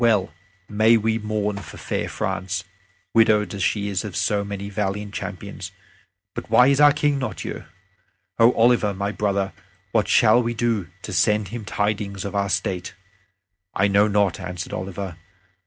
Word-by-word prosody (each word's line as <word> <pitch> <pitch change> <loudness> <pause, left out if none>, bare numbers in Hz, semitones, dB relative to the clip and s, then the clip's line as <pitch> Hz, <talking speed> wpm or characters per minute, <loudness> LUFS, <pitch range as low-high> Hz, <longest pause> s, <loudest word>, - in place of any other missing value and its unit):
Well 105 -8 +2 0.3
may 110 +2 +4
we 110 +1 0
mourn 105 -1 -2
for 100 - -11
fair - - -3
France, 95 0 -3 0.5
widowed 105 -3 +4
as 100 - -5
she 100 +2 0
is 100 -2 -2
of 105 -5 -6
so 105 -1 +1
many 100 0 -5
valiant 105 0 -3
champions. 95 -2 -6 0.6
But - - -7
why 125 +2 +6
is 140 +1 +3
our 145 0 +8
King 145 -1 +1
not 130 -5 -4
here? - - -6 0.7
O 115 +1 +7
Oliver, 115 -3 +3
my 100 +1 -2
brother, 100 -3 -1 0.4
what 110 -2 +2
shall 115 0 +5
we 120 0 -2
do 115 -5 0 0.2
to 105 - -6
send 105 +1 +2
him 115 0 -6
tidings 105 -2 -2
of 100 - -4
our 100 0 0
state?" 90 +1 -2 0.8
"I 100 - +3
know 100 +1 +4
not," 100 -3 +1
answered 90 -2 -6
Oliver. 95 -2 -5
105 Hz, 165 wpm, -23 LUFS, 95-110 Hz, 0.8 s, our